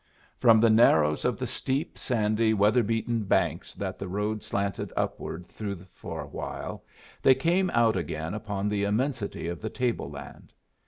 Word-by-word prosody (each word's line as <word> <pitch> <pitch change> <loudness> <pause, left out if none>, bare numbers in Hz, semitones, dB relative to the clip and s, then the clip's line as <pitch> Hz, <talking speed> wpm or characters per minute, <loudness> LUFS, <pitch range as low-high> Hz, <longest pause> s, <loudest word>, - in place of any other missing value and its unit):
From 115 -2 +6
the 115 0 +5
narrows 80 -9 +4
of - - +1
the - - -3
steep, 135 +3 -2
sandy, 110 -2 +1
weather 105 +4 +4
beaten 115 +1 0
banks 90 -4 0
that 95 -2 -4
the 100 - -4
road 105 +3 -2
slanted 100 0 -2
upward 85 +2 -3
through 100 -4 -6
for - - -6
a - - -8
while, - - -6 0.4
they 130 - +6
came 175 +7 +2
out 115 -6 +3
again 80 -2 -3
upon 105 -2 -3
the 105 -1 0
immensity 105 - -1
of 85 -1 -4
the 110 - -3
table 125 -1 -1
land. - - -11
105 Hz, 165 wpm, -28 LUFS, 100-115 Hz, 0.4 s, From